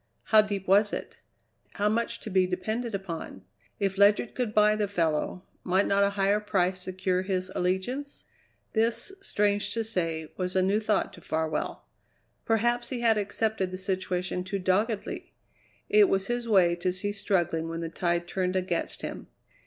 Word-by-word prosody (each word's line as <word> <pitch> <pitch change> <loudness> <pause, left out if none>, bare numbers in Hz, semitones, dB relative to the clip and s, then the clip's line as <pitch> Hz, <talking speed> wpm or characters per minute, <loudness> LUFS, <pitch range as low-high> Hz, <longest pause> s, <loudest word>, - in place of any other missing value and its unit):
How 215 -1 +6
deep 200 -2 -4
was 205 +2 +5
it? - - -5 0.6
how 205 - 0
much 230 +2 0
to 215 - -6
be 185 -1 +3
depended 215 +5 -2
upon? 165 - -6 0.4
If 195 -1 -1
Ledyard 205 +3 +4
could 245 -4 -2
buy 210 0 +4
the 210 -1 0
fellow, 170 -1 -1 0.2
might 190 +2 +2
not 200 0 +3
a 200 - +3
higher 200 +1 +3
price 185 -3 0
secure 185 0 -1
his 185 -1 -2
allegiance? 190 +11 -2 0.5
This, 230 - +1
strange 205 - 0
to 225 - 0
say, 165 -7 -2
was 180 0 -2
a 185 - +4
new 200 +3 +2
thought 215 -2 0
to 175 - -13
Farwell. 160 0 -2 0.6
Perhaps 240 +2 +1
he 250 -3 -3
had 225 -2 +4
accepted 210 -1 -1
the 185 - -6
situation 185 -1 -2
too 190 +2 -3
doggedly; 200 +4 -1 0.5
it 415 -1 +5
was 195 0 +1
his 240 +1 -2
way 180 -5 +5
to 180 +1 0
cease 205 +3 -2
struggling 170 -5 0
when 165 0 -4
the 165 - -3
tide 175 0 -1
turned 185 0 -1
against 180 -2 -2
him. - - -6
195 Hz, 170 wpm, -28 LUFS, 180-215 Hz, 0.6 s, How